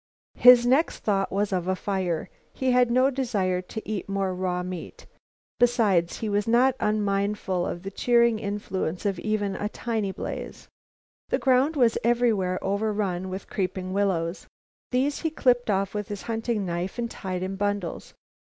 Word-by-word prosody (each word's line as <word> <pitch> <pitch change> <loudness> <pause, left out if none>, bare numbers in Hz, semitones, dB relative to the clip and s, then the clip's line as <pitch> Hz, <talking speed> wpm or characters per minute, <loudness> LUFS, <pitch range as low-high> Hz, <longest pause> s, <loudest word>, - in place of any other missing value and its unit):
His 250 -1 +8
next 270 +7 +2
thought 195 -2 +1
was 200 0 0
of 180 -1 -1
a 185 - +1
fire. 185 -4 -2 0.3
He 260 -1 0
had 250 -1 +4
no 255 +3 +3
desire 205 -9 0
to 215 +4 -8
eat 210 -2 -4
more 195 -1 -1
raw 180 -1 -2
meat, 180 -2 -7 0.5
besides 215 -8 +3
he 220 - -1
was 205 0 0
not 245 +3 +4
unmindful 200 -3 0
of 175 - -5
the 195 - -5
cheering 235 +1 +3
influence 200 -4 -3
of 195 -3 0
even 205 -2 -1
a 210 - -3
tiny 220 -4 -2
blaze. - - -6 0.6
The - - +2
ground 265 +4 +3
was 240 -5 +3
everywhere 225 -6 +2
over 200 +3 0
run 190 -3 -2
with 190 +2 -5
creeping 185 -1 -3
willows. 185 -4 -1 0.4
These 270 +3 0
he 320 - 0
clipped 245 -6 +2
off 195 -1 0
with 210 -1 -3
his 205 -2 -6
hunting 225 -2 -2
knife 175 +3 -3
and 240 - -1
tied 185 -1 -4
in 190 +1 -3
bundles. 205 -3 -3
205 Hz, 165 wpm, -26 LUFS, 185-235 Hz, 0.6 s, His